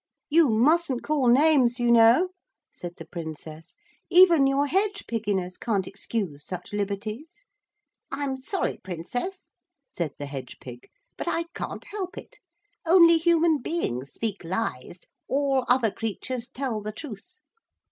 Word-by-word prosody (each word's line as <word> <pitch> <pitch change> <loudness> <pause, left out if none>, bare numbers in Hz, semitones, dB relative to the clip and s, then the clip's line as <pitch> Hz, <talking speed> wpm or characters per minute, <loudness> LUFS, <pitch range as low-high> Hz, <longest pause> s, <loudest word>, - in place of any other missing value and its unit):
'You 315 -1 +5
mustn't 265 +4 +2
call 290 -4 +1
names, 260 -2 +4
you 240 0 +2
know,' 235 +10 +6 0.4
said 175 -1 -8
the 165 - -9
Princess, 160 -1 -8 0.3
'even 345 -6 +7
your 275 +1 +2
hedge 400 +6 0
pigginess 200 -5 -2
can't 205 -6 0
excuse 195 -7 -4
such 180 +3 -7
liberties.' 215 - -4 0.7
'I'm 275 -2 -2
sorry, 380 +8 -2
Princess,' 245 - -5 0.5
said 155 -5 -2
the 145 - -5
hedge 135 -3 -7
pig, 125 -1 -11 0.3
'but - - -5
I 335 - 0
can't - - -6
help 390 -2 -6
it. - - -11 0.4
Only 335 -1 +6
human 330 -2 +3
beings 140 - -2
speak 215 -5 -4
lies; 175 - -4 0.3
all 270 -2 +1
other 245 -3 +4
creatures 230 +3 -4
tell 250 -5 -3
the 210 +1 -4
truth. 240 - -10
240 Hz, 135 wpm, -26 LUFS, 190-315 Hz, 0.7 s, even